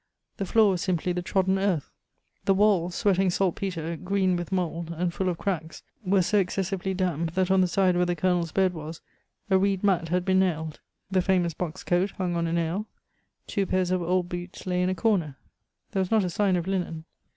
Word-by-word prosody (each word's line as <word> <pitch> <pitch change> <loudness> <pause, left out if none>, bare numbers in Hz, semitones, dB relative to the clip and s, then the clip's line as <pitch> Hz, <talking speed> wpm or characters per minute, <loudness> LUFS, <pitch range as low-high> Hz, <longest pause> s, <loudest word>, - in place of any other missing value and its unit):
The 195 - -3
floor 220 -1 +5
was 180 -2 -1
simply 180 -1 0
the 180 - -2
trodden 190 +1 +1
earth. 190 -7 0 0.5
The 195 - +4
walls, 190 -4 +3
sweating 195 -3 +2
salt 180 0 +1
petre, 170 -4 -3
green 185 0 +1
with 175 0 -4
mould, 170 -3 -2
and 175 0 -1
full 185 +1 -1
of 175 - -2
cracks, 165 -5 -3 0.2
were 190 -1 +3
so 210 +4 +2
excessively 190 0 -1
damp 170 -3 -1
that 185 0 +1
on 190 0 +5
the 185 - +3
side 185 0 +2
where 180 0 +2
the 175 - 0
Colonel's 175 -1 0
bed 190 -2 +2
was 160 0 -7 0.5
a 190 - +5
reed 195 0 +1
mat 180 -5 +2
had 180 +1 0
been 190 -1 +3
nailed. 160 -4 -1 0.3
The 190 -1 +3
famous 180 -3 +1
box 160 0 -5
coat 180 +3 +1
hung 180 -2 -1
on 170 0 0
a 165 - -2
nail. 170 +5 -1 0.6
Two 195 -2 -1
pairs 185 -1 0
of 185 -1 +1
old 180 +1 0
boots 175 +1 -7
lay 180 -1 0
in 180 - +1
a 185 - -1
corner. 170 -7 0 0.5
There 195 - 0
was 185 - -1
not 220 -2 +3
a 180 - -2
sign 195 +1 +2
of 175 -2 -1
linen. 180 -4 -3
180 Hz, 215 wpm, -26 LUFS, 175-190 Hz, 0.6 s, floor